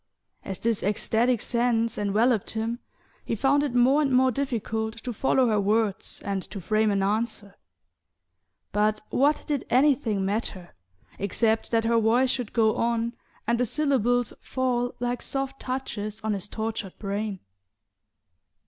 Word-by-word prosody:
As 195 - -5
this 230 +1 0
ecstatic 225 +3 +1
sense 235 -2 +1
enveloped 210 +2 +1
him 225 +2 -2 0.4
he - - -2
found 270 +6 +3
it 285 -4 -2
more 260 +5 +5
and 280 -3 +1
more 260 0 +4
difficult 225 -4 -2
to 245 - -3
follow 260 +2 +2
her 210 -2 +2
words 210 0 0
and 195 -1 -1
to 200 - -8
frame 215 +4 +1
an 200 -1 +1
answer; 210 -1 -1 1.2
but 215 +1 +1
what 290 +3 +2
did 290 -4 -1
anything 250 -7 +3
matter, 195 -3 -3 0.5
except 220 +3 +1
that 225 -1 +1
her 230 0 +3
voice 240 +4 +3
should 245 -5 -3
go 220 -2 +2
on, 235 0 0 0.3
and 235 +1 +1
the 250 - +3
syllables 245 -3 +1
fall 250 -2 -1
like 245 0 -2
soft 270 0 -3
touches 220 -5 -4
on 220 -1 0
his 200 -1 -3
tortured 220 -3 -4
brain? 200 -1 -3
230 Hz, 145 wpm, -26 LUFS, 210-250 Hz, 1.2 s, more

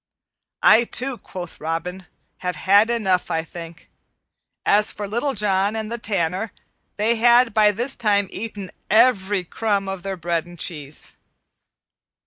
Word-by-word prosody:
"I, 235 +2 +7
too," 255 +1 -2
quoth 175 -2 -9
Robin, 170 +3 -4 0.3
"have 180 -1 -3
had 205 +4 +4
enough, 195 -7 +1
I 160 0 0
think." 165 -1 -10 0.8
As 210 +1 +3
for 205 - -6
Little 240 +7 -1
John 200 0 +1
and 220 0 -4
the 235 - -3
Tanner, 195 0 -1 0.4
they 225 +3 +1
had 240 0 +5
by 210 -1 +5
this 240 +6 -1
time 205 -4 +2
eaten 205 -3 -6 0.2
every 205 -4 +3
crumb 200 +2 -1
of 195 -1 -4
their 195 0 -4
bread 170 0 -2
and 175 0 -12
cheese. 150 -3 -5
200 Hz, 140 wpm, -22 LUFS, 180-225 Hz, 0.8 s, I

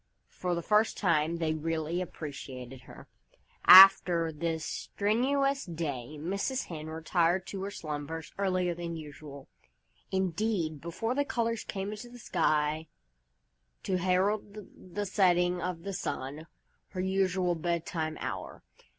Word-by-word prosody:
For 180 -1 -2
the 170 - -3
first 215 +3 +2
time, 165 -3 +1
they 160 -2 0
really 160 +2 -2
appreciated 135 -6 -7
her. - - -12 0.6
After 180 -3 +9
this 160 +1 -4
really 210 +3 +2 0.2
strenuous 275 0 +1
day 155 - -5
Mrs. 200 - -2
Hen 155 -2 -7
retired 165 +3 +1
to 195 - -6
her 195 - -3
slumbers 155 -3 -6
earlier 185 -3 +1
than 170 0 -5
usual 145 -2 -10 0.6
indeed, 185 -4 -1
before 200 +8 -2
the 285 +2 +1
colors 230 -4 -1
came 195 +1 -4
into 215 +3 -8
the 245 - -12
sky 155 -6 0 1.0
to 185 - 0
herald 195 +3 0 0.4
the 205 0 -1
setting 180 -2 +2
of 180 -2 -4
the 195 0 -4
sun, 145 -1 -4 0.4
her 185 - -5
usual 190 -1 +1
bedtime 165 -1 -2
hour. - - -6
175 Hz, 130 wpm, -30 LUFS, 160-195 Hz, 1.0 s, After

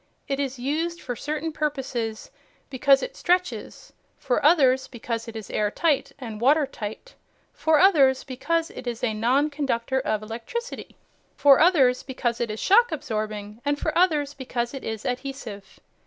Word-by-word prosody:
It 275 0 -2
is 275 -2 -2
used 320 +7 -2
for 245 - -5
certain 305 +5 -3
purposes 265 -7 -3 0.4
because 275 +1 +4
it - - -5
stretches, 360 0 -1 0.2
for 250 - -1
others 270 -5 +4
because 230 -1 -5
it 230 - -8
is 220 -3 -7
airtight 270 +8 0
and 225 -5 -7
watertight, 275 - 0 0.4
for 315 -1 +2
others 280 -8 +5
because 325 +6 -2
it 250 - -9
is 235 0 -4
a 225 -3 +1
non 255 +8 +2
conductor 265 -3 -1
of 215 -5 -2
electricity, 240 - -6 0.4
for 280 -1 +6
others 285 -7 +4
because 240 -3 -3
it 235 - -1
is 215 0 -5
shock 460 +2 +4
absorbing, 215 -6 -4
and 290 0 0
for 310 - -2
others 305 -5 +2
because 245 -3 -3
it 270 - -7
is 220 -1 -5
adhesive. 250 -6 -6
265 Hz, 155 wpm, -25 LUFS, 235-300 Hz, 0.4 s, for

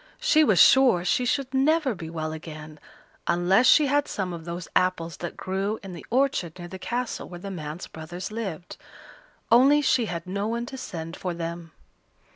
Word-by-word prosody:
She 405 -11 +4
was 210 -11 +3
sure 250 -10 +6
she 255 +3 +1
should 270 +1 -1
never 280 0 +2
be 165 -5 -8
well 155 -1 -4
again, 155 -1 -9 0.5
unless 180 +7 +3
she 300 - +6
had 285 +1 +1
some 185 -3 -3
of 165 -1 -8
those 170 0 -6
apples 170 -3 +1
that 175 - -6
grew 195 +3 -2
in 190 -2 -8
the 170 - -9
orchard 245 - 0
near 175 -1 -8
the 190 +2 -9
castle 245 +4 -3
where 175 - -8
the 195 +2 -7
man's 155 -1 -6
brothers 175 +5 -8
lived; 195 -6 -6 0.7
only 270 +5 +6
she 245 -4 +2
had 170 -2 -5
no 200 +3 -2
one 235 +1 -2
to 265 - -8
send 165 -8 -6
for 180 -2 -4
them. 170 0 -6
185 Hz, 185 wpm, -25 LUFS, 170-245 Hz, 0.7 s, sure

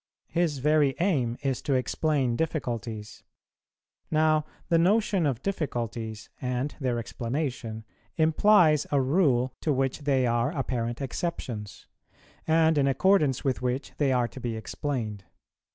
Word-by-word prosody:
His 165 -4 0
very 145 0 +3
aim 135 -11 +1
is 135 -3 -1
to 140 - 0
explain 130 -1 0
difficulties; 115 -8 -3 0.9
now 155 -1 +3 0.2
the 165 - +3
notion 195 -2 +3
of 130 -3 -2
difficulties 115 - -3
and 125 +3 -2
their 125 -4 0
explanation 115 -2 -4 0.3
implies 160 -1 +4
a 140 - +3
rule 130 -3 +2
to 155 - 0
which 135 0 0
they 140 -3 +1
are 120 +6 0
apparent 120 -2 -2
exceptions, 120 - -5 0.6
and 160 -1 +4
in 140 - +3
accordance 150 -1 +3
with 130 -2 0
which 125 +2 -2
they 140 -3 +3
are 125 -2 +2
to - - -10
be 120 -2 -3
explained. 110 -2 -4
135 Hz, 130 wpm, -27 LUFS, 120-155 Hz, 0.9 s, implies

